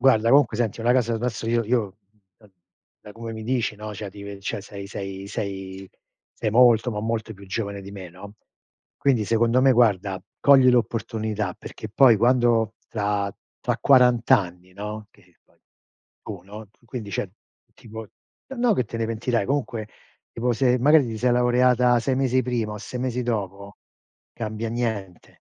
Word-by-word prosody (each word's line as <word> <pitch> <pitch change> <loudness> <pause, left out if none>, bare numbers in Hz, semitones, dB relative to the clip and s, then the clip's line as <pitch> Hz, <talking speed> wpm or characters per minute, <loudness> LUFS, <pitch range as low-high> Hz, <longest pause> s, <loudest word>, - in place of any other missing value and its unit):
Guarda, 115 -3 +4
comunque 135 -5 +4
senti, 115 -2 -1
una 120 +2 +3
casa, 120 -2 +1
adesso 115 -1 -3
io 115 -1 +1
io 110 -4 -1 0.4
da 105 - -21 0.5
da 105 - -12
come 115 +1 -7
mi 110 0 -7
dici, 120 -3 -1
no? 105 0 -7
Cioè, 100 0 -6
ti 100 +1 -11
ve 100 -1 -8
cioè 100 - -4
sei 100 0 -9
sei 95 -1 -6
sei 95 -3 -6 0.4
sei 110 - -2
molto, 120 0 +5
ma 105 -2 -3
molto 110 0 -3
più 100 +1 -14
giovane 100 +1 -4
di 100 0 -10
me, 95 -3 -8
no? 100 +4 -12 0.6
Quindi, 130 -6 +2
secondo 115 +3 +2
me 135 - +6
guarda, 100 -6 +2 0.2
cogli 135 -3 +6
l'opportunità 110 -4 -1
perché 110 - -9
poi 115 +1 +6
quando, 120 -1 +2
tra 100 -2 -1 0.3
tra - - -1
quarant'anni, 115 -9 +3
no? 105 +2 -6
Che 90 -4 -26
poi - - -33 0.6
tu, 100 -4 -8
no, 105 +2 -11
tu 115 - -33
quindi 115 -4 -6
cioè 100 +1 -2 0.5
tipo 110 0 -9 0.4
ehm 270 - -9
no 240 -1 +3
che 125 - 0
te 115 - -7
ne 115 - 0
pentirai, 115 -1 -1
comunque 125 -6 -2 0.4
tipo, 120 +1 0
se 125 +1 +2
magari 145 +1 +5
ti 110 - -5
sei 125 +2 +2
laureata 125 0 +3
6 130 +3 0
mesi 130 -1 +2
prima 115 -3 -2
o 105 - -6
6 125 +4 -7
mesi 125 -1 -2
dopo, 100 -4 -4 0.5
cambia 110 0 -4
niente, 110 -6 -4
110 Hz, 170 wpm, -24 LUFS, 100-125 Hz, 0.6 s, me